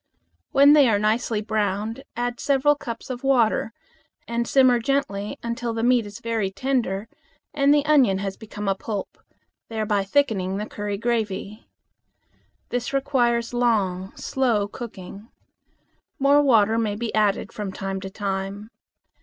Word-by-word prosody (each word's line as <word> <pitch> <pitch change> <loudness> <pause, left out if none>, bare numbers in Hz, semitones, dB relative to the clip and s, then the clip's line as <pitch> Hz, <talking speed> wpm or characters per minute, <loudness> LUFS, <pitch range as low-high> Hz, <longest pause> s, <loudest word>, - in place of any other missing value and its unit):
When 280 +2 +7
they 285 -5 +6
are 210 - +3
nicely 215 +1 0
browned 215 +3 -2
add 245 0 -2
several 280 +1 +3
cups 240 -3 -7
of 250 0 -6
water 240 -5 +2 0.6
and 235 0 -1
simmer 260 -3 +4
gently 225 -6 -1
until 235 0 -3
the 225 - -2
meat 240 -3 +3
is 205 +3 -10
very 225 -4 -1
tender 225 -2 -1 0.5
and 280 -1 +3
the 290 0 +3
onion 270 -10 +4
has 195 0 -4
become 210 -1 -7
a 195 - +3
pulp, 200 +1 -6 0.5
thereby 215 -3 0
thickening 195 -5 0
the 210 - -3
curry 205 -1 -4
gravy. 215 -2 -3 1.0
This 245 +3 -3
requires 245 -4 +1
long, 195 -6 0
slow 235 -6 0
cooking. 205 -1 -9 0.9
More 280 +1 +4
water 225 -5 +4
may 215 -3 -1
be 230 +1 -4
added 210 -2 +1
from 205 -2 -4
time 195 0 -4
to 195 - -6
time. 195 +2 -4
225 Hz, 140 wpm, -24 LUFS, 205-245 Hz, 1.0 s, When